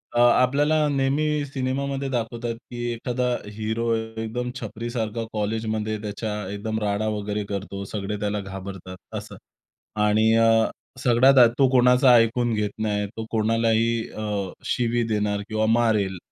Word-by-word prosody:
अ, - - +3
आपल्याला 140 +5 +4
नेहमी 145 +2 +1
सिनेमामध्ये 135 0 -2
दाखवतात, 120 -1 -3
की 120 0 -8
एखादा 125 +2 -2 0.3
हीरो 110 +2 -1
एकदम 110 +2 -4
छपरीसारखा 115 0 -4
कॉलेजमध्ये 110 0 -2
त्याच्या 105 +1 -4 0.2
एकदम 110 +2 -3
राडा 105 +1 -1
वगैरे 105 0 -3
करतो, 100 0 -5
सगळे 105 +1 -4
त्याला 105 0 -1
घाबरतात 95 -1 -8 0.2
असं - - -8 0.7
आणि 110 +1 +3
अ, 115 0 +4 0.4
सगळ्यात 130 +3 +5
आधी 120 -2 +7
तो 135 - +6
कोणाचा 125 0 +5
ऐकून 115 +1 +3
घेत 105 -1 0
नाही, 105 -1 0
तो 110 +2 -7
कोणालाही 115 +1 +2 0.2
अ, 105 -3 -3
शिवी 120 -1 0
देणार 105 -1 0
किंवा 110 0 0
मारेल, 110 -5 +2
115 Hz, 130 wpm, -24 LUFS, 105-120 Hz, 0.7 s, आधी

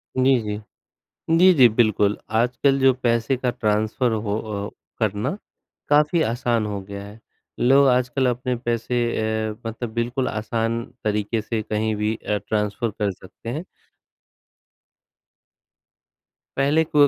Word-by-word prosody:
जी, 130 0 +4
जी। 105 -1 -4 0.8
जी, 185 +2 +7
जी 130 -7 +7
बिल्कुल। 110 -2 +2 0.2
आजकल 125 +4 +2
जो 135 -1 +5
पैसे 120 +2 +2
का 125 0 -1
ट्रांसफर 110 +2 0
हो 105 -1 -1 0.3
अ, - - -8 0.3
करना 110 - -1 0.5
काफ़ी 150 +3 +4
आसान 120 -3 0
हो 100 -1 -4
गया 100 +1 -8
है, 105 +2 -12 0.4
लोग 135 +3 +5
आजकल 125 +1 +2
अपने 125 +1 -1
पैसे 120 0 -1 0.5
अ, - - -8
मतलब 115 +1 -4
बिल्कुल 120 +3 -1
आसान 115 +2 -2 0.2
तरीके 105 +1 0
से 110 +1 -2
कहीं 110 +1 -1
भी 105 +1 -1
अ, 105 -1 -2
ट्रांसफ़र 105 +2 -1
कर 105 -1 +1
सकते 95 +4 -11
हैं। 150 +9 -4 2.9
पहले 145 +4 +3
को 150 -2 +4
115 Hz, 130 wpm, -23 LUFS, 105-130 Hz, 2.9 s, जी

